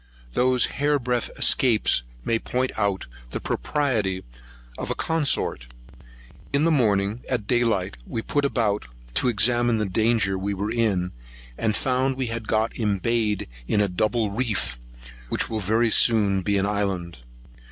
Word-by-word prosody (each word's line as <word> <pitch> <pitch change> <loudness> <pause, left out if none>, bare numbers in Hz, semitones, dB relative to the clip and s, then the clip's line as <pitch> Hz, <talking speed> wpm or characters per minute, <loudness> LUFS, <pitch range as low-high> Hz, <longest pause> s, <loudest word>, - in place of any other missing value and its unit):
Those 125 0 +3 0.2
hair 145 0 +3
breadth 125 -2 -1
escapes 115 - +4 0.2
may 115 - +1
point 125 +3 -1
out 100 -3 0 0.2
the - - -4
propriety 110 -11 -1 0.5
of - - -5
a - - -1
consort. 150 - 0 0.8
In 140 +2 +2
the 165 - +3
morning, 105 -5 +1
at 120 -5 -1
day 120 +1 +2
light, 100 - 0
we 115 - -3
put 145 - 0
about, 110 - 0 0.3
to 125 - +1
examine 120 +1 +3
the 105 - 0
danger 105 -1 +1
we 100 +1 -2
were 100 +3 -2
in, 100 -6 0 0.4
and 110 - 0
found 130 +2 0
we 130 - -1
had 115 -2 -5
got 110 +2 +1
embayed 105 0 0 0.2
in 105 - +1
a 105 - +3
double 110 +3 0
reef, 105 - -2 0.5
which - - -1
will 110 - -1
very 110 +3 +2
soon 105 -5 +3
be 100 +2 +1
an 95 - +1
island. 95 -7 -2
110 Hz, 150 wpm, -24 LUFS, 100-125 Hz, 0.8 s, escapes